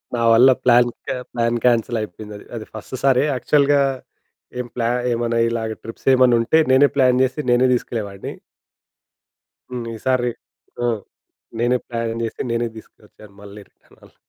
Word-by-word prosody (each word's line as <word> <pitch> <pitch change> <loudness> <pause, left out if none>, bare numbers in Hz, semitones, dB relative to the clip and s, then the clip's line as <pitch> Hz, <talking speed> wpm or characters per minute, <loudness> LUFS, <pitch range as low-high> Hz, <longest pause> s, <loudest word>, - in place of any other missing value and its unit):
నా 120 - -2
వల్ల 125 +4 +7
plan 120 0 +5 0.2
K - - -2 0.2
plan 120 0 0
cancel 120 -1 +2
అయిపోయిందది. 105 +1 -9
అది 110 - -6
ఫస్ట్ 110 +4 -8
సారి 135 0 +4
యాక్చువల్‌గా 140 +2 +2 0.8
ఏం 125 - -4
ప్లా 115 -1 0 0.2
ఏమైనా 115 0 -1
ఇలాగ 110 -1 -3
ట్రిప్స్ 115 - -11
ఏమైనా 125 -2 +5
ఉంటే 140 +7 +2
నేనే 140 +2 +6
ప్లాన్ 130 -2 +3
జేసి 130 +4 -1
నేనే 125 +1 +4
తీసుకెళ్ళేవాడిని. 105 -5 -4 1.4
హ్మ్, 120 -2 -4
ఈ - - -7
సారి 125 -2 +2 0.5
హ్మ్. 120 -3 0 0.6
నేనే 120 +2 +2
ప్లాన్ 115 -1 -3
జేసి 115 - -4
నేనే 115 0 -1
తీసుకొచ్చాను, 105 -1 -17
మళ్ళీ 100 +1 -11
రిటర్న్ - - -27
అలా. - - -20
120 Hz, 145 wpm, -20 LUFS, 115-125 Hz, 1.4 s, వల్ల